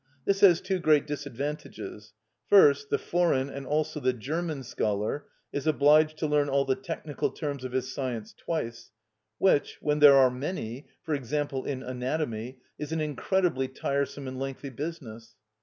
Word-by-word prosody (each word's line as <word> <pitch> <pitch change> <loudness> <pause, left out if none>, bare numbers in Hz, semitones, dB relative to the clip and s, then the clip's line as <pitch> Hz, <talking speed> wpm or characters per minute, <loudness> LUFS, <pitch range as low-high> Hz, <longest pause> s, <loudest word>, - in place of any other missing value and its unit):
This 195 0 +2
has 180 -4 +6
two 185 0 -1
great 155 -4 +4
disadvantages. 140 -6 -6 0.3
First, 145 -8 +6
the - - +2
foreign 165 -6 +1
and 135 -1 -7
also 150 0 0
the 130 -2 +1
German 150 +4 -3
scholar 110 +2 -2 0.3
is 145 +1 -3
obliged 155 +1 +4
to 155 - -2
learn 145 -1 +2
all 140 0 +2
the 135 - +2
technical 165 -4 -3
terms 145 -4 -5
of 130 - -5
his 130 0 -2
science 120 -6 -4
twice, 115 -8 -4 0.5
which, 185 -7 +2
when 150 0 0
there 145 -2 +9
are 130 -2 +6
many—for 135 +1 -5
example, 140 0 -2
in 135 -2 -3
Anatomy—is 130 +1 -4
an 160 - -1
incredibly 155 -1 0
tiresome 140 +1 -2
and 130 0 -6
lengthy 135 +1 -5
business. 125 -6 -7
140 Hz, 150 wpm, -28 LUFS, 130-155 Hz, 0.5 s, there